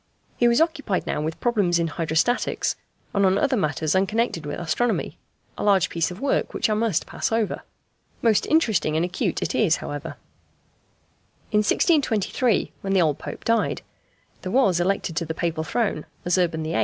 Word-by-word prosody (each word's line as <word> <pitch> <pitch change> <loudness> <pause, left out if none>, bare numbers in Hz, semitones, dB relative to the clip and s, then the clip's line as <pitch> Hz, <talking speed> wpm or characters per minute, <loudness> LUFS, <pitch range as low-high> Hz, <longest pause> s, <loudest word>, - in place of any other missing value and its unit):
He 240 - +3
was 235 +1 +4
occupied 285 - 0
now - - -2
with 160 +1 -4
problems 205 -8 +2
in 170 - +1
hydrostatics, 165 +9 0 0.4
and 200 - +2
on 190 0 +4
other 280 -3 +2
matters 155 -5 0
unconnected 190 -4 0
with 145 - -4
astronomy: 220 +8 -1 0.4
a - - -2
large 195 -4 +3
piece 165 -1 0
of 180 +2 -8
work 275 +1 0
which - - +1
I - - +3
must 215 -5 0
pass - - -3
over. 225 -2 0 0.6
Most 225 -3 +3
interesting 210 - +2
and 160 +2 +2
acute 180 +1 -2
it - - -2
is, - - +3
however. - - -6 1.3
In 210 - +3
1623, 230 - +1
when 195 0 -2
the 190 - +4
old 150 -3 0
Pope - - -7
died, 230 0 +1 0.6
there 185 - -5
was 200 -9 +3
elected 180 -2 0
to 170 - 0
the 160 - -4
Papal 165 -2 -1
throne, 200 -5 -1 0.2
as 175 - +2
Urban 170 -3 0
VIII. 160 +1 -1
190 Hz, 175 wpm, -24 LUFS, 165-230 Hz, 1.3 s, was